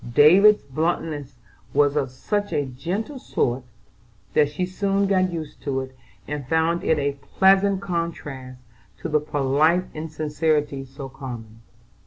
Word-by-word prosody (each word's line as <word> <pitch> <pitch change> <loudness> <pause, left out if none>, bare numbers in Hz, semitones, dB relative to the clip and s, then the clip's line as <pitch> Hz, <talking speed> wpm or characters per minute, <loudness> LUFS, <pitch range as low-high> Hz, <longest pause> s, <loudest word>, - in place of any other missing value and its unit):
David's 195 +8 +7
bluntness 150 -1 -2 0.4
was 145 0 +4
of 140 -3 0
such 205 +11 -2
a 145 - 0
gentle 180 - -4
sort 125 - -1 0.7
that 145 -1 +4
she 155 +5 -2
soon 195 +2 0
got 185 -2 +2
used 160 -3 -6
to 135 -2 -1
it, 130 0 -9 0.3
and 145 -2 -4
found 160 +3 +1
it 160 - +2
a 140 -1 -1 0.2
pleasant 195 0 +5
contrast 150 -8 -4 0.4
to - - -5
the 150 0 +3
polite 150 +4 +2
insincerity 150 -2 -1
so 135 +1 -8
common. 120 -5 -9
150 Hz, 135 wpm, -23 LUFS, 135-180 Hz, 0.7 s, David's